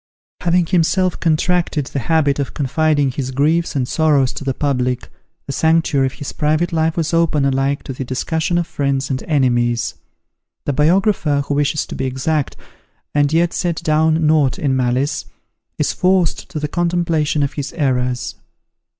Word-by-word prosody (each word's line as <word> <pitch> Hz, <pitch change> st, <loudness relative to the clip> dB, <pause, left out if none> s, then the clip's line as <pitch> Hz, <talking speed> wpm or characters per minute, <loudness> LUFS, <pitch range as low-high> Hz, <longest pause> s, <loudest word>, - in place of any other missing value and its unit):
Having 175 Hz, 0 st, +2 dB
himself 185 Hz, +1 st, +1 dB
contracted 165 Hz, -2 st, +1 dB
the 140 Hz, -, -4 dB
habit 145 Hz, 0 st, +1 dB
of 140 Hz, -, -3 dB
confiding 145 Hz, 0 st, +1 dB
his 130 Hz, 0 st, -4 dB
griefs 155 Hz, +6 st, +1 dB
and 130 Hz, -3 st, 0 dB
sorrows 145 Hz, -4 st, +2 dB
to -, -, -7 dB
the 135 Hz, -2 st, -2 dB
public, 125 Hz, -3 st, -1 dB, 0.4 s
the -, -, -5 dB
sanctuary 160 Hz, -3 st, +2 dB
of 130 Hz, -, -6 dB
his 145 Hz, -, -6 dB
private 155 Hz, +3 st, 0 dB
life 160 Hz, 0 st, +1 dB
was 165 Hz, 0 st, -1 dB
open 160 Hz, -4 st, +2 dB
alike 135 Hz, +1 st, 0 dB
to 135 Hz, -, -6 dB
the 130 Hz, -, -5 dB
discussion 160 Hz, +7 st, -1 dB
of 175 Hz, -, +1 dB
friends 140 Hz, -3 st, -1 dB
and 130 Hz, -, -2 dB
enemies. 120 Hz, -5 st, +1 dB, 0.7 s
The 145 Hz, -, 0 dB
biographer, 155 Hz, -1 st, +2 dB
who 145 Hz, -, -2 dB
wishes 145 Hz, +1 st, 0 dB
to -, -, -8 dB
be 135 Hz, -, -3 dB
exact, 130 Hz, +3 st, -1 dB, 0.6 s
and 145 Hz, -1 st, +2 dB
yet 170 Hz, +1 st, +2 dB
set 175 Hz, -2 st, -1 dB
down 160 Hz, 0 st, +2 dB
nought 150 Hz, -4 st, +3 dB
in 135 Hz, -3 st, 0 dB
malice, 130 Hz, +2 st, 0 dB, 0.5 s
is -, -, 0 dB
forced 185 Hz, -2 st, +1 dB
to 155 Hz, -, -4 dB
the 150 Hz, -, -2 dB
contemplation 170 Hz, -3 st, 0 dB
of 140 Hz, -, -2 dB
his 145 Hz, -2 st, -4 dB
errors. 125 Hz, -4 st, -1 dB
150 Hz, 165 wpm, -18 LUFS, 135-165 Hz, 0.7 s, nought